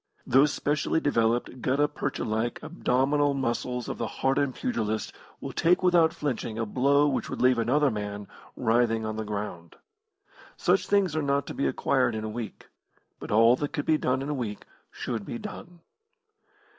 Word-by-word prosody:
Those 135 +3 +4
specially 150 +2 0
developed, 120 -3 0
gutta 140 +4 +2
percha - - -3
like 110 +2 -1
abdominal 140 +3 +1
muscles 125 -1 -2
of - - -5
the 115 - -1
hardened 135 +1 0
pugilist 110 -3 -2 0.3
will - - -6
take 180 +3 +2
without 175 -3 +5
flinching 130 -8 -3
a 115 - -1
blow 140 +6 +3
which 135 - -1
would - - -5
leave 125 -1 +4
another 135 +5 +2
man 105 -1 -5 0.3
writhing 115 -1 +1
on 110 0 -3
the 110 - -2
ground. 100 -5 -6 0.8
Such - - +2
things 195 -6 +2
are 155 - +1
not 140 -1 0
to - - -6
be 140 - 0
acquired 125 -4 +1
in 110 - -3
a 110 - -3
week, 115 0 -7 0.5
but - - -8
all 115 +3 +6
that 145 +3 -3
could 145 -4 -2
be 155 -1 +3
done 130 +1 0
in 140 - -4
a - - 0
week 115 -7 -4 0.2
should 115 -4 -4
be 240 - -5
done. 180 -6 -9
125 Hz, 175 wpm, -27 LUFS, 110-145 Hz, 0.8 s, all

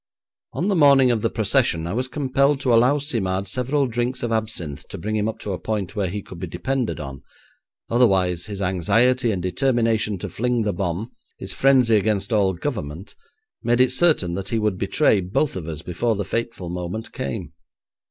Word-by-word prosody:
On 180 - -1
the 200 - +2
morning 140 -5 +6
of 115 -3 0
the - - +1
procession 80 0 +1
I 85 - -3
was 125 +3 -1
compelled 140 0 +1
to 125 - +2
allow 125 +5 +5
Simard 100 -10 -2
several 130 +7 0
drinks 120 +1 -2
of 120 - -1
absinthe 100 -10 -3
to - - -7
bring 110 +1 -3
him 105 0 0
up 110 - -6
to 105 - -4
a 90 - -4
point 105 -3 -3
where 100 -4 0
he 100 +2 -5
could 90 - -11
be 90 - -4
depended 120 +5 -2
on, 70 -3 -7 0.7
otherwise 95 -7 +2
his 100 -1 -5
anxiety 115 +8 +2
and 90 -4 -3
determination 115 0 +1
to 95 - -5
fling 115 +6 -1
the 105 -1 -1
bomb, 100 +3 -3 0.3
his - - -3
frenzy 130 -5 +4
against 105 0 0
all 100 -3 +3
government, 90 - -5 0.5
made 120 +1 +1
it 130 0 +5
certain 130 - +3
that 95 +2 -4
he 115 - 0
would 105 -4 0
betray 105 0 +2
both 95 +11 -1
of 85 -4 -5
us 80 -1 -6
before 110 +7 -1
the 100 -1 -3
fateful 115 -4 -3
moment 90 +5 -5
came. 70 - -5
110 Hz, 190 wpm, -22 LUFS, 95-125 Hz, 0.7 s, morning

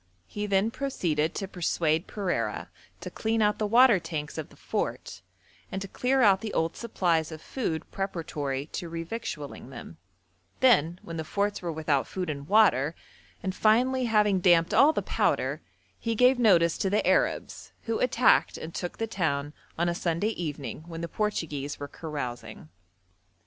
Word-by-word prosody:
He 210 - -4
then 200 +2 +2
proceeded 170 - -1
to 195 - -3
persuade 165 -3 0
Pereira 145 - -2 0.3
to - - -6
clean 225 +1 -1
out 210 -1 +2
the 215 - 0
water 235 -1 +6
tanks 155 -3 -5
of 155 - -6
the - - -18
fort, - - -4 0.5
and 190 - -3
to 195 - -6
clear 255 +6 +1
out 195 -2 +5
the 220 -2 -5
old 165 +1 0
supplies 170 -8 0
of 160 - -7
food 165 - -3
preparatory 155 -8 -3
to 170 - -5
revictualling 165 - -6
them; 120 -10 -10 0.6
then, 175 - +4
when 165 -1 -7
the 160 - -2
forts 200 +5 -1
were 175 -2 -3
without 155 -3 0
food 180 -4 -3
and 140 -1 -7
water, 170 -8 +4 0.5
and 190 0 -2
finally 250 +6 +3
having 210 -4 +3
damped 175 -2 +4
all 290 +3 +6
the - - -2
powder, - - 0 0.4
he 230 -1 -2
gave 250 +2 +4
notice 170 -8 +4
to 195 - +1
the 205 +2 +1
Arabs, - - 0
who 225 -1 -2
attacked 250 -1 +3
and 160 +1 -7
took 175 - -5
the 225 - -1
town 150 -9 -2 0.2
on 170 +1 +1
a 175 - +1
Sunday 170 +4 -1
evening, 150 - -5
when 165 -1 -7
the 170 - -3
Portuguese 155 -9 -3
were 145 - -5
carousing. 140 - -6
175 Hz, 165 wpm, -27 LUFS, 155-215 Hz, 0.6 s, water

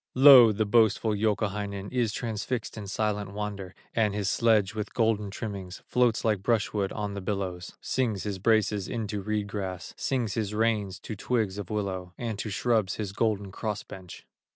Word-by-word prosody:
Lo! 130 -4 +9
the 110 +1 0
boastful 110 0 +3
Youkahainen 100 -2 -1
Is 120 -4 +1
transfixed 115 +2 -3
in 105 -3 -7
silent 105 0 -2
wonder, 100 -3 -5 0.2
And 105 -3 +1
his 100 -2 0
sledge 110 -4 +3
with 105 -1 -5
golden 110 -3 +1
trimmings 95 -3 -6
Floats 125 -2 +2
like 105 -4 +2
brushwood 105 -2 0
on 105 -1 -3
the 100 - -5
billows; 95 -2 -4
Sings 115 -7 -1
his 100 -2 -3
braces 105 -1 +2
into 105 -3 -3
reed 105 +1 -1
grass, 95 -3 -5
Sings 120 -6 -1
his 105 -2 -2
reins 105 -4 +1
to 110 - -6
twigs 105 -2 -1
of 100 - -6
willow, 95 -4 -3
And 115 -4 -4
to 110 - -3
shrubs 110 -2 +1
his 105 -3 -4
golden 105 -3 0
cross 105 0 -3
bench. 95 -2 -11
105 Hz, 170 wpm, -28 LUFS, 100-110 Hz, 0.2 s, Lo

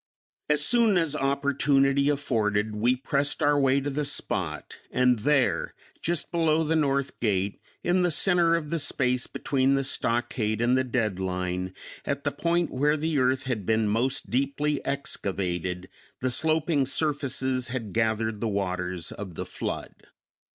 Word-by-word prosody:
As 150 -1 +4
soon 230 -5 +4
as 165 -4 +1
opportunity 140 0 +2
afforded 110 -7 0
we 120 +4 +2
pressed 140 +4 -1
our 145 -1 +4
way 135 0 +3
to 145 +1 -3
the 150 +2 -1
spot, 90 - -3
and 125 -2 +2
there, 140 +3 +1 0.3
just 170 -2 -2
below 160 -2 +2
the 160 +1 0
north 140 -3 0
gate, 100 -3 -1 0.2
in 180 +1 +2
the 180 - +2
center 170 0 +3
of 155 -3 -3
the 165 - 0
space 125 -3 +1
between 135 0 +1
the 135 - 0
stockade 120 -4 -1
and 120 +2 +3
the 130 - +2
dead 115 -7 -1
line, 90 0 -3 0.3
at 140 -1 -3
the 145 - 0
point 170 +4 0
where 150 +4 +2
the 155 -1 0
earth 130 +1 +2
had 125 -6 -2
been 110 +2 +1
most 120 +6 -1
deeply 140 +3 0
excavated, 90 - -2 0.3
the 130 0 -1
sloping 155 0 +1
surfaces 130 -3 0
had 120 -5 -5
gathered 110 -1 0
the 115 - 0
waters 90 -4 -2
of 95 -4 -8
the - - -4
flood. - - -5
130 Hz, 155 wpm, -26 LUFS, 110-145 Hz, 0.3 s, As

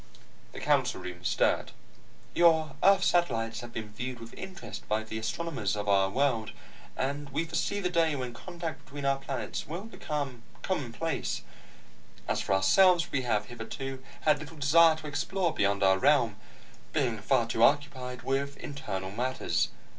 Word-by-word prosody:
The - - -8
council - - +2
room 90 -1 -8
stirred. - - +1 0.6
"Your 160 -3 +4
earth 195 -1 +6
satellites 115 -10 +1
have 120 0 -8
been 110 -2 -6
viewed 125 +2 -5
with 115 0 -10
interest 190 0 -8
by 110 +1 +1
the 110 0 -5
astronomers 110 -1 -2
of 105 0 -4
our 95 -1 +4
world, 120 -2 0 0.4
and 140 +2 -2
we 150 +4 -1
foresee 165 +5 -1
the 180 -2 0
day 165 -3 +3
when 125 -3 -4
contact 160 0 -6
between 140 0 -7
our 135 0 +2
planets 135 -1 -4
will 170 +5 -5
be 225 - -12
commonplace. 140 - -3 0.8
As - - 0
for 95 - +1
ourselves, 175 - +5
we 135 - +1
have 110 -4 0
hitherto 125 +4 -6 0.2
had 150 -2 +3
little 150 +2 -9
desire 160 +3 +6
to 155 -1 -10
explore 170 +4 -1
beyond 100 0 +1
our 95 0 +5
realm, 130 -6 +3 0.6
being 125 -8 +1
far 120 +3 +2
too 115 0 -2
occupied 130 -2 +2
with 140 +1 -1
internal 95 -10 -5
matters. 125 +5 0
135 Hz, 155 wpm, -29 LUFS, 115-160 Hz, 0.8 s, earth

